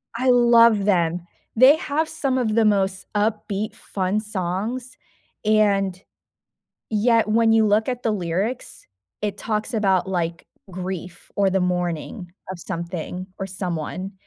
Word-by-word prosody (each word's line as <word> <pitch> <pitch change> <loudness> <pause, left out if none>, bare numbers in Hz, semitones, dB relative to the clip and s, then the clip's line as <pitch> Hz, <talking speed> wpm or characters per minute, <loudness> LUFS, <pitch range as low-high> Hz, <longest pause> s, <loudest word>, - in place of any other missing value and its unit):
I 255 +2 +1
love 235 -4 +5
them. 175 -3 +1 0.3
They 260 +5 +7
have 315 -2 -1
some 275 -5 -1
of 220 -4 0
the 225 -1 +4
most 195 -2 +1
upbeat 210 0 -1
fun 190 +1 -2
songs, 215 +5 -4 0.5
and, 200 -3 +2 0.9
yet 225 +1 +3
when 225 +1 +3
you 220 -1 +4
look 210 +3 +2
at 250 -1 -3
the 225 - +1
lyrics, 195 +6 -3 0.4
it 210 -1 -2
talks 215 +2 -2
about, 195 -3 +2
like, 170 -2 -2 0.2
grief 185 -1 -6
or 200 -1 +3
the 190 0 +1
mourning 180 +1 -2 0.2
of 185 - -6
something 175 +1 -5
or 195 - -3
someone, 185 0 -4
205 Hz, 135 wpm, -22 LUFS, 185-225 Hz, 0.9 s, They